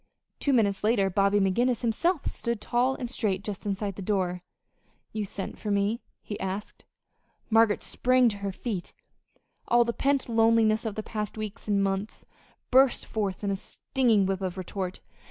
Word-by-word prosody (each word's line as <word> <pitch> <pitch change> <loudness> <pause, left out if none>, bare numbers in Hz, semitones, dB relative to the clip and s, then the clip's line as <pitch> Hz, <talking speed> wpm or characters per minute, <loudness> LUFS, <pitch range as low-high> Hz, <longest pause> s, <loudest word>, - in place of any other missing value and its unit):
Two 285 - +1
minutes 210 -7 +2
later 210 -3 +3
Bobby 200 +2 +3
McGinnis 235 +5 +2
himself 290 - +1
stood 235 -2 -2
tall 250 +4 +1
and 250 - -4
straight 200 -5 -1
just 205 0 -5
inside 200 0 -2
the - - -5
door. 180 -2 -1 0.7
"You 215 -1 -2
sent 195 0 -6
for 215 - -4
me?" 205 +3 +1 0.2
he 205 0 -6
asked. 195 +1 -5 0.7
Margaret 225 -1 +4
sprang 255 0 +3
to 205 - -5
her 200 -1 -3
feet. 190 -2 -5 0.7
All 240 0 +5
the 235 - -1
pent 275 +1 +1
loneliness 225 -1 +3
of 215 -2 -3
the 215 - -3
past 210 -1 -4
weeks 215 +1 -6
and 200 -1 +2
months 195 +2 -2 0.5
burst 265 0 +5
forth 205 -3 -3
in 200 - 0
a - - +1
stinging 225 +1 +1
whip 190 0 -1
of 185 -1 -3
retort. 185 0 -4
210 Hz, 170 wpm, -27 LUFS, 195-235 Hz, 0.7 s, All